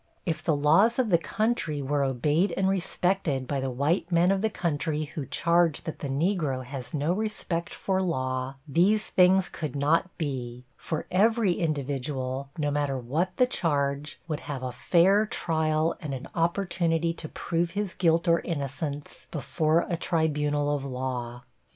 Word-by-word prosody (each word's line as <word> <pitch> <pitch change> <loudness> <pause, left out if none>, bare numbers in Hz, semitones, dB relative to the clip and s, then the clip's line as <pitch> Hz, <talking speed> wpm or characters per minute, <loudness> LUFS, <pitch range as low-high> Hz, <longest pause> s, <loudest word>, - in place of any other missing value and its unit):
If 160 -2 -1
the 160 - +2
laws 165 +11 +4
of 245 -5 +1
the 170 - +5
country 215 -7 -1
were 140 +1 0
obeyed 145 +8 +1
and 190 - +2
respected 180 -7 0
by 140 0 -1
the 135 0 -2
white 150 +8 0
men 175 +2 +4
of 195 -1 +1
the 220 - +1
country 155 -4 -1
who 150 -2 -6
charge 170 -2 +2
that 160 - -6
the 140 - -4
Negro 145 -3 0
has 130 -1 -6
no 155 +2 0
respect 190 -5 -2
for 190 -1 -1
law, 130 -6 -2
these 190 +9 +3
things 185 +1 +4
could 150 -5 -5
not 150 +6 +2
be, 125 -5 -4
for 160 -2 -4
every 215 +1 +3
individual, 140 -4 -2
no 145 -2 0
matter 145 -2 0
what 155 +10 -2
the 250 - +5
charge, 145 - -1
would 155 -3 -2
have 135 -3 -6
a 130 - -2
fair 190 - +3
trial 160 -4 0
and 145 -5 -4
an 130 - -7
opportunity 170 -1 +1
to 155 -2 -8
prove 170 0 -1
his 205 -3 -1
guilt 170 0 +2
or 170 0 +5
innocence 145 -2 -5
before 155 +2 +1
a 170 - -1
tribunal 150 -4 0
of 140 - -4
law. 125 -2 -4
155 Hz, 165 wpm, -27 LUFS, 140-175 Hz, -, the